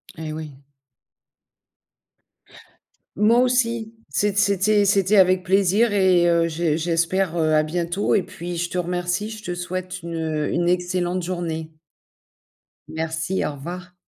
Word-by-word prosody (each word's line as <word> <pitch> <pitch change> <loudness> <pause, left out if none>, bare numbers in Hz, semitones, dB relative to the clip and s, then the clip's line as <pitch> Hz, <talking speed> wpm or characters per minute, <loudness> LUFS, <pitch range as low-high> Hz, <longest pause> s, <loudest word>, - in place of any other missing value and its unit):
Et 160 -1 -6
oui. 155 -1 -6 2.6
Moi 220 +4 +4
aussi, 235 -3 +1 0.2
c'ét 205 -1 0
c'était 205 +1 +3
c'était 195 0 +3
avec 185 -1 +4
plaisir 195 +4 +3
et 185 -3 +4
heu, 170 0 +3
j'e 160 -1 0
j'espère, 170 +2 0
heu, 155 -1 +2
à 155 - +4
bientôt 175 +4 -1
et 205 - +3
puis 175 +1 -7
je 175 +1 -2
te 180 - -4
remercie, 180 +3 -2
je 215 -1 -9
te 175 -3 -4
souhaite 185 +1 -5
une, 170 0 -5
heu, 155 -2 -2
une 175 0 0
excellente 180 0 -1
journée. 165 -3 -4 1.2
Merci, 160 +3 -2
au 150 - -3
revoir. 175 +6 -8
180 Hz, 135 wpm, -22 LUFS, 165-195 Hz, 2.6 s, Moi